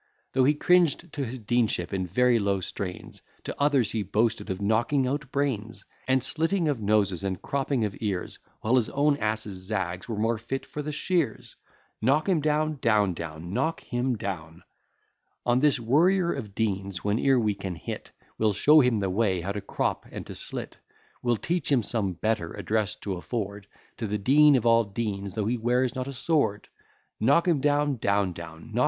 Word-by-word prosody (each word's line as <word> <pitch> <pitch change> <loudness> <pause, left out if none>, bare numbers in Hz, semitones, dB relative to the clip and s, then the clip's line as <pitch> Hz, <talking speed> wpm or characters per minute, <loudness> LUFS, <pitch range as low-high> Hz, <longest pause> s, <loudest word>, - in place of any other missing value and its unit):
Though 130 -1 +4
he 150 +3 +4
cringed 175 -1 +2
to 145 - -2
his 125 +2 -5
deanship 105 -5 0
in 95 -1 -1
very 120 +5 +3
low 100 -1 +1
strains, 90 0 -6 0.2
To - - -5
others 140 -7 +3
he 110 - -1
boasted 105 +2 0
of 95 0 -3
knocking 115 +7 +1
out 135 +1 -3
brains, 120 -6 -2 0.2
And 130 -1 +3
slitting 165 +5 +1
of 140 -6 -1
noses, 100 -3 +1
and 95 -2 -2
cropping 135 -4 -1
of 100 - -4
ears, 100 -5 -3 0.2
While 120 +4 +3
his 115 -3 +1
own 145 +1 +2
ass's 110 -5 -2
zags 95 -2 -3
were 110 - -3
more 115 +1 +1
fit 130 +4 -4
for 150 - -6
the 150 +1 -4
shears. 155 - -1 0.5
Knock 140 - +2
him 180 -5 +2
down, 155 0 0
etc. 100 - -1 0.8
On 120 +1 +3
this 145 -1 +3
worrier 170 +9 +3
of 105 -8 -7
deans 100 -4 -2
whene'er 120 +6 +3
we 105 -3 +1
can 95 -2 -5
hit, - - -7 0.3
We'll 110 -1 +3
show 150 +10 +6
him 125 -6 +3
the 95 - 0
way 95 -3 +1
how 95 +4 -3
to 100 0 -4
crop - - -2
and - - -7
to - - -8
slit; - - -6 0.4
We'll 120 -2 +1
teach 165 +3 -1
him 130 -5 +3
some 100 -4 -1
better 105 -1 -1
address 105 -1 -1
to 95 -3 -3
afford 100 0 -4 0.3
To 115 - -3
the 105 +1 -1
dean 145 +7 +5
of 120 -3 +1
all 115 0 +5
deans, 100 -2 -4
though 105 - -1
he 120 +3 0
wears 125 +2 +1
not 130 -1 -4
a 140 - -5
sword. 135 -7 0 0.5
Knock 140 - +3
him 160 -6 +2
down, 145 -2 +1
etc. 85 -5 -1
115 Hz, 175 wpm, -27 LUFS, 100-140 Hz, 0.8 s, show